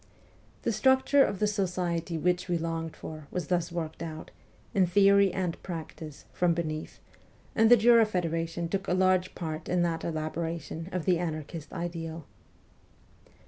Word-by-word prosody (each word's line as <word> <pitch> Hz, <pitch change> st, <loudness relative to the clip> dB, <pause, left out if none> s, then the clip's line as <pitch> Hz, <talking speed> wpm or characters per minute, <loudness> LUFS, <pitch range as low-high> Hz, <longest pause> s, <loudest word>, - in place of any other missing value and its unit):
The -, -, +1 dB
structure 265 Hz, +1 st, +4 dB
of 200 Hz, -, -1 dB
the 210 Hz, -, +1 dB
society 180 Hz, -4 st, -1 dB
which 180 Hz, +3 st, 0 dB
we 175 Hz, -2 st, +1 dB
longed 165 Hz, -1 st, -3 dB
for 155 Hz, -2 st, -9 dB
was 180 Hz, -4 st, -4 dB
thus 175 Hz, -1 st, 0 dB
worked 165 Hz, -2 st, -4 dB
out, 160 Hz, -1 st, -6 dB, 0.4 s
in 190 Hz, -2 st, +3 dB
theory 200 Hz, +1 st, +5 dB
and 180 Hz, -3 st, -3 dB
practice, 160 Hz, -3 st, -7 dB
from 175 Hz, -2 st, +2 dB
beneath, 155 Hz, -2 st, -4 dB, 0.5 s
and 225 Hz, 0 st, +4 dB
the 245 Hz, -, +9 dB
Jura 230 Hz, 0 st, +6 dB
Federation 165 Hz, -3 st, -2 dB
took 195 Hz, +3 st, -3 dB
a 180 Hz, -, +2 dB
large 185 Hz, -1 st, +2 dB
part 160 Hz, -2 st, -5 dB
in 180 Hz, 0 st, +2 dB
that 165 Hz, -1 st, -1 dB
elaboration 165 Hz, +1 st, -4 dB
of 180 Hz, -3 st, -3 dB
the 180 Hz, -3 st, +3 dB
anarchist 160 Hz, -2 st, -5 dB
ideal. 165 Hz, -3 st, -5 dB
170 Hz, 150 wpm, -29 LUFS, 165-185 Hz, 0.5 s, the